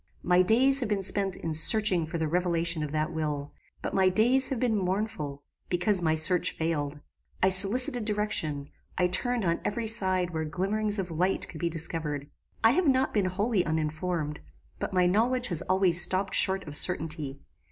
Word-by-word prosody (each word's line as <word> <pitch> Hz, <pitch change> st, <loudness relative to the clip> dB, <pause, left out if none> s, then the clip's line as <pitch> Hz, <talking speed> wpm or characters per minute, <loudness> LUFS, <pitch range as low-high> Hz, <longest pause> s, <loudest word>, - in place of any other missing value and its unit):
"My 180 Hz, +1 st, +3 dB
days 260 Hz, +8 st, +2 dB
have 240 Hz, -5 st, -4 dB
been 200 Hz, -2 st, -2 dB
spent 195 Hz, -1 st, 0 dB
in 165 Hz, -, -5 dB
searching 180 Hz, +1 st, +4 dB
for 170 Hz, -, -5 dB
the 160 Hz, -1 st, -2 dB
revelation 170 Hz, -1 st, -1 dB
of 150 Hz, -2 st, -5 dB
that 155 Hz, +2 st, -3 dB
will; 150 Hz, -3 st, -4 dB, 0.3 s
but -, -, -4 dB
my 190 Hz, -1 st, +2 dB
days 245 Hz, +7 st, +3 dB
have 265 Hz, -, -3 dB
been 235 Hz, -3 st, 0 dB
mournful, 185 Hz, -7 st, -4 dB, 0.3 s
because 180 Hz, +2 st, +1 dB
my 160 Hz, -2 st, 0 dB
search 175 Hz, +3 st, +2 dB
failed. 150 Hz, -3 st, -4 dB, 0.4 s
I 190 Hz, -, +4 dB
solicited 220 Hz, +6 st, +5 dB
direction: 205 Hz, -10 st, -2 dB, 0.3 s
I 180 Hz, -, +1 dB
turned 230 Hz, +5 st, -1 dB
on 170 Hz, 0 st, -1 dB
every 230 Hz, +2 st, -3 dB
side 185 Hz, -5 st, +1 dB
where 160 Hz, -1 st, -4 dB
glimmerings 205 Hz, +6 st, -2 dB
of 185 Hz, -3 st, -5 dB
light 180 Hz, +4 st, -1 dB
could 160 Hz, -, -11 dB
be 170 Hz, -, -2 dB
discovered. 155 Hz, -3 st, -3 dB, 0.3 s
I 225 Hz, -, +5 dB
have 345 Hz, +5 st, 0 dB
not 265 Hz, -1 st, +1 dB
been 205 Hz, -3 st, 0 dB
wholly 200 Hz, +2 st, -1 dB
uninformed; 155 Hz, 0 st, -3 dB, 0.4 s
but -, -, -4 dB
my 180 Hz, -1 st, +1 dB
knowledge 240 Hz, +7 st, 0 dB
has 170 Hz, -3 st, +2 dB
always 185 Hz, -2 st, +4 dB
stopped 185 Hz, +2 st, -1 dB
short 190 Hz, -2 st, +3 dB
of 145 Hz, -, -6 dB
certainty. 155 Hz, -5 st, 0 dB
180 Hz, 180 wpm, -27 LUFS, 160-210 Hz, 0.4 s, solicited